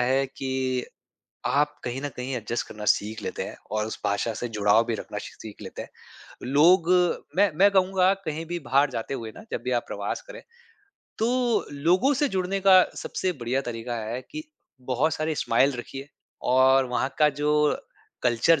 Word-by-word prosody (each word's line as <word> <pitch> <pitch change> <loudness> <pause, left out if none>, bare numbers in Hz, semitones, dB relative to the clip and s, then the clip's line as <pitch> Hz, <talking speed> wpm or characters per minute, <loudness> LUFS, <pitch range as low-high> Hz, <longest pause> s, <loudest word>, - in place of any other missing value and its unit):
है 130 +2 +2
कि 130 -1 -2 0.6
आप 145 +1 +2
कहीं 125 +2 -3
न 145 - -2
कहीं 125 +2 -4
एडजस्ट 120 +1 -3
करना 105 -1 -8
सीख 105 +2 +1
लेते - - -4
हैं - - -8
और 110 0 -1
उस 110 - -6
भाषा 100 +3 0
से 120 - -4
जुड़ाव 105 +1 +3
भी 115 - -1
रखना - - -5
श - - -8 0.2
सीख 110 -2 -9
लेते - - -7
हैं। - - -11 0.6
लोग 165 +5 +5 0.5
मैं 200 0 +5
मैं 200 +3 +6
कहूँगा 190 0 +3
कहीं 160 +1 -3
भी 175 0 -2
बाहर 140 +1 +4
जाते 120 +3 -4
हुए 115 -4 -5
ना - - -10
जब - - -3
भी 125 - -1
आप - - -7
प्रवास - - -3
करें, - - -9 0.8
तो 240 +1 +1
लोगों 180 - +3
से 290 +1 +1
जुड़ने 190 0 -1
का 190 -1 +7 0.2
सबसे 185 -1 -2
बढ़िया 130 -1 -2
तरीका 120 +1 -4
है 120 +4 -4
कि 310 - -5 0.5
बहुत 145 +6 +2
सारे 155 0 -1
स्माइल 135 +2 +2
रखिए 135 +3 -7 0.4
और 130 +1 +5
वहाँ 125 +2 0
का 150 -1 +6
जो 150 +1 0 0.7
कल्चर 125 +7 +3
135 Hz, 180 wpm, -26 LUFS, 120-175 Hz, 0.8 s, का